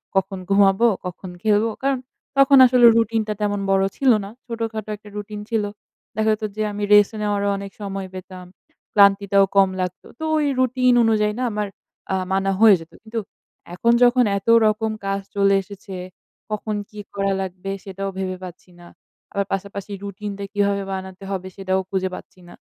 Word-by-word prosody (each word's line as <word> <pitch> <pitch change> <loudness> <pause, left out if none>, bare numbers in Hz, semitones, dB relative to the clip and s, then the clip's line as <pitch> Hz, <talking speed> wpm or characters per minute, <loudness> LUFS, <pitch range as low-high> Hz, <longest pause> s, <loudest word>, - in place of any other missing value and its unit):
কখন 195 0 0
ঘুমাবো, 195 +3 +4 0.2
কখন 180 +1 -6
খেলবো? 215 +1 +2
কারণ, 270 -1 +1 0.4
তখন 275 0 +6
আসলে 250 -1 +5
রুটিনটা 225 -1 +1
তেমন 205 -1 0
বড় 195 0 +3
ছিল 265 -2 +4
না। 200 - -7 0.2
ছোটখাটো 225 -3 -4
একটা 210 0 -15
রুটিন 210 0 -6
ছিল। 225 -2 +1 0.5
দেখা 220 +1 +1
যেতো 215 0 -3
যে 215 - -3
আমি 205 0 -4
রেস্ট 205 0 +6
নেওয়ারও 205 -1 0
অনেক 195 0 -7
সময় 195 -1 -4
পেতাম। 185 0 -9 0.5
ক্লান্তিটাও 200 -1 +5
কম 195 -1 +6
লাগতো। 180 0 -5
তো 315 - -6
ওই 300 - +1
রুটিন 255 0 +3
অনুযায়ী 210 -2 +2
না 255 - -1
আমার 210 -1 -2 0.5
আ - - +2 0.2
মানা 195 0 +1
হয়ে 220 -3 +8
যেতো। 165 - -14
কিন্তু, 225 +1 -4 0.5
এখন 235 +6 +2
যখন 245 +1 +5
এত 195 - -8 0.2
রকম 215 +1 +1
কাজ 195 0 0 0.2
চলে 200 0 +4
এসেছে, 195 0 -10 0.6
কখন 215 0 -2
কি 210 - -11 0.2
করা 195 0 0
লাগবে? 190 +1 -5
সেটাও 195 0 -5
ভেবে 185 -1 -3
পাচ্ছি 180 0 -10
না। 175 - -14 0.5
আবার 200 0 0
পাশাপাশি 200 +1 -5
রুটিনটা 200 0 -6
কীভাবে 200 -1 +1
বানাতে 190 0 -6
হবে? 185 -1 -3
সেটাও 190 -1 -1
খুঁজে 190 -1 -1
পাচ্ছি - - -13
না। - - -13
200 Hz, 170 wpm, -22 LUFS, 195-220 Hz, 0.6 s, হয়ে